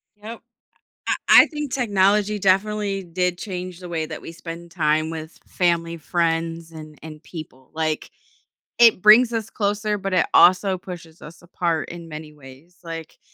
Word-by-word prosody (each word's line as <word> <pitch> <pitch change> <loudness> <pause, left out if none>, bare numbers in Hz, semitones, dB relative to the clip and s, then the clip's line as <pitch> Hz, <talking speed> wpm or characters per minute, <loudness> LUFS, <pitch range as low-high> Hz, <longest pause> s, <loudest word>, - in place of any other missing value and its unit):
Yep, 220 +3 -9 0.7
I - - +3
I - - +9
think 295 -4 -6
technology 210 -3 +2
definitely 195 +1 +1
did 180 +1 -1
change 180 -3 -6
the 180 - -9
way 165 -2 -2
that - - -7
we - - -8
spend 170 +1 -9
time 155 -2 0
with 160 0 -8
family, 170 -2 0
friends, 165 0 -2
and 155 -1 -11
and 155 -1 -10
people, 155 -7 -11
like, 155 -1 -2 0.7
it 230 -5 +6
brings 225 +3 +7
us 225 -2 -3
closer, 210 0 -1
but 195 -1 -4
it 180 -2 +3
also 185 +1 +5
pushes 170 -3 -11
us 160 +2 -12
apart 170 -3 -2
in 170 -1 -9
many 155 -1 -9
ways, 150 +5 -16
like, 165 -2 -8
175 Hz, 160 wpm, -22 LUFS, 160-200 Hz, 0.7 s, I